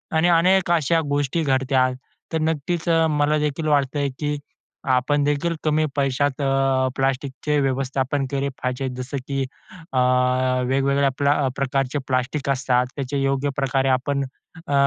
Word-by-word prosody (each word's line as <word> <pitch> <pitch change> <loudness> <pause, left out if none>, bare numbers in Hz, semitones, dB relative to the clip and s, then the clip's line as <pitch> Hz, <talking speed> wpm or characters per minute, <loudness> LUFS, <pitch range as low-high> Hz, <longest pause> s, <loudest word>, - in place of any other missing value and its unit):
आणि 160 +2 +3
अनेक 175 +2 +4
अशा 165 0 +3
गोष्टी 145 +3 0
घडतात. 130 -2 +2 0.4
तर 160 - +1
नक्कीच 160 +2 -1 0.2
मलादेखील 150 +1 0
वाटतयं, 145 -1 +1
की 150 -1 -1 0.6
आपणदेखील 145 +5 +1
कमी 155 0 +2
पैशात 140 0 0
अ, 135 -1 +2
प्लास्टिकचे 135 +2 -1
व्यवस्थापन 135 +1 -1
केले 140 0 -1
पाहिजे. 125 +1 -1
जसं 130 +2 -5
की 135 -1 -1 0.5
अ, 130 - +2 0.7
वेगवेगळ्या 140 +1 +2
प्ल 140 - +1
अ, 145 -2 +2
प्रकारचे 135 0 0
प्लास्टिक 135 +2 -1
असतात. 125 -2 +2
त्याचे 140 0 -2
योग्यप्रकारे 135 -1 0
आपण 140 +2 +1 0.4
अ, 145 - -2
140 Hz, 125 wpm, -22 LUFS, 135-145 Hz, 0.7 s, अनेक